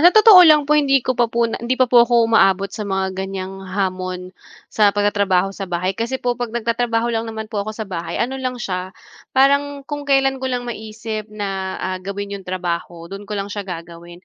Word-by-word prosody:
sa 340 - +8
totoo 430 0 +8
lang 305 -4 +7
po 295 - +1
hindi 275 -3 +3
ko 255 - +1
pa 240 -1 +1
po 235 +1 +1
na - - -4
hindi 240 +2 -1
pa 255 - +4
po 245 -1 +5
ako 235 -1 +4
uma-abot 195 -3 +3
sa - - -7
mga 190 -1 -1
ganiyang 190 0 -5
hamon 185 -1 -3 0.4
sa 210 -2 +4
pag-tatrabaho 200 -2 +1
sa 195 -1 -7
bahay. 180 +2 -1
Kasi 230 +6 -3
po 250 -1 -1
'pag 245 0 -4
nag-tatrabaho 230 0 -1
lang 225 0 -2
naman 220 0 -5
po 205 - -1
ako 215 +1 -5
sa 220 - -4
bahay, 175 -4 -5
ano 265 +3 -2
lang 255 -1 -3
siya, 185 -5 -4 0.5
parang 280 +1 +3
kung 290 0 -6
kailan 270 -1 +2
ko 260 - -2
lang 250 -1 -2
ma-isip 220 -2 -6
na, 195 -3 -4
ah, 185 0 -3
gawin 200 +2 -5
'yong 195 -2 -7
trabaho 175 -2 -4
do'n 195 +3 -9
ko 210 - -3
lang 200 +1 -4
siya 200 -2 -6
gagawin. 170 +1 -9
215 Hz, 215 wpm, -20 LUFS, 190-245 Hz, 0.5 s, sa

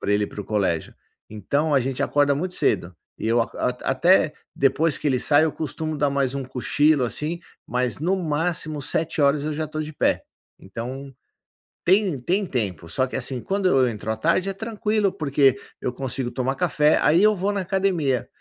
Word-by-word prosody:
pra 100 - 0
ele 105 0 +2
ir - - -4
pro 105 - -7
colégio. 95 -7 -1 0.3
Então 140 +9 -1
a 135 - +5
gente 130 +1 -2
acorda 145 -1 +2
muito 180 +6 -3
cedo 90 +1 0 0.2
e - - -4
eu 115 +1 +3
aco 115 - -8 0.3
até 155 +4 +3 0.2
depois 140 +3 +2
que 150 - -4
ele 130 -3 +2
sai 145 +3 +4
eu 160 - 0
costumo 155 +1 -4
dar 145 0 +2
mais 140 -1 0
um 140 - -2
cochilo, 135 +3 +2
assim, 150 +7 -3 0.3
mas 125 0 -1
no 175 +6 +1
máximo 155 -2 -2
07:00 150 -1 +1
eu 155 - -2
já 155 +1 -2
estou 155 0 -4
de 155 0 -7
pé. - - +1 0.4
Então, 130 +7 -7 0.7
tem 190 -5 +3
tem 185 +11 0
tempo. 95 - -3
Só 130 +8 +1
que, 130 - -7
assim, 125 -1 -3
quando 195 - 0
eu 130 -5 +4
entro 110 -1 -5
à 110 - -3
tarde, 170 - +1
é - - -2
tranquilo, 210 -1 -1
porque 140 -3 +2 0.2
eu 125 - -3
consigo 130 -1 -3
tomar 135 +1 -1
café, 150 -1 +3
aí 165 +4 +4
eu 215 +1 +5
vou 195 +2 0
na 200 -1 -1
academia. 180 - 0
145 Hz, 190 wpm, -23 LUFS, 130-165 Hz, 0.7 s, a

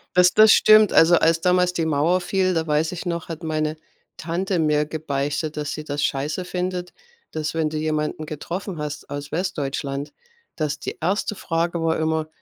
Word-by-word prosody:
Das 180 0 +6
das 215 0 +7
stimmt. 215 -2 +6
Also, 165 +2 +6
als 165 0 +2
damals 180 0 +3
die 165 -2 -1
Mauer 160 +4 +2
fiel, 185 +1 +1
da 165 -2 0
weiß 155 +1 +1
ich 180 - -6
noch, 170 -2 -3
hat 165 +1 -6
meine 155 -1 -1 0.4
Tante 175 +3 -2
mir 150 -1 +2
gebeichtet, 150 0 -3
dass 150 -1 -3
sie 155 - -6
das 145 -1 -3
Scheiße 150 +6 -1
findet, 180 0 -3 0.4
dass, 155 -1 -3
wenn 160 -1 0
du 155 - -4
jemanden 155 0 -2
getroffen 170 +4 -5
hast 150 -1 -6
aus 145 0 -6
Westdeutschland, 145 -5 -3 0.4
dass 150 -1 -2
die - - -6
1. 195 +5 -1
Frage 170 -1 -1
war 165 0 +1
immer: 160 0 0
160 Hz, 180 wpm, -23 LUFS, 150-180 Hz, 0.4 s, das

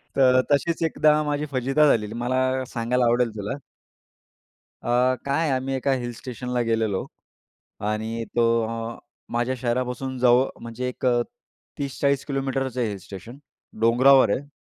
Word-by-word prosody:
तर 130 -1 +5
तशीच 165 +4 +1
एकदा 155 -1 +3
माझी 150 0 -1
फजिती 135 +3 0
झालेली. 110 -5 +1
मला 130 +2 0
सांगायला 125 0 0
आवडेल 120 0 +2
तुला. 105 +7 -4 1.2
अ, 125 +1 +2
काय 145 +3 0
आहे. - - 0
आम्ही 135 +1 -3
एका 135 +1 0
हिल 120 -2 -2
स्टेशनला 125 +1 -4
गेलेलो 110 -4 0 0.8
आणि 110 +2 -2
तो 120 - +4 0.9
माझ्या 120 +2 0
शहरापासून 125 +1 -2
जव 125 +1 +5 0.2
म्हणजे 115 +2 -5
एक 125 +1 -4
अ, 120 -1 +3 0.6
30-40 140 0 0
किलोमीटरचं 135 -2 -2
आहे 120 - +1
हिल 100 - -5
स्टेशन. 100 +7 -10 0.4
डोंगरावर 130 +3 +5
आहे. 145 - -8
125 Hz, 135 wpm, -24 LUFS, 120-135 Hz, 1.2 s, तर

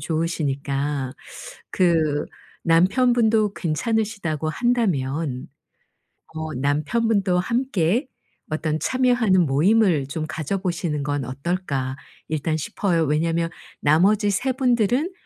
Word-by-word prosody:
좋으시니까 145 -4 -2 0.6
그 160 -5 +2 0.4
남편분도 215 +4 +3
괜찮으시다고 175 -2 -1
한다면 155 - -1 0.9
어 160 0 -4
남편분도 180 - +1
함께 235 - 0 0.4
어떤 155 0 -1
참여하는 245 -8 +2
모임을 160 +1 +3
좀 155 +2 -4
가져보시는 170 -2 -2
건 145 -1 -2
어떨까 140 -1 -3 0.3
일단 155 0 -1
싶어요. 165 +2 0
왜냐하면 165 +3 0 0.3
나머지 195 +8 +3
3 245 +7 0
분 260 0 0
분들은 245 - +1
165 Hz, 240 characters per minute, -23 LUFS, 150-215 Hz, 0.9 s, 남편분도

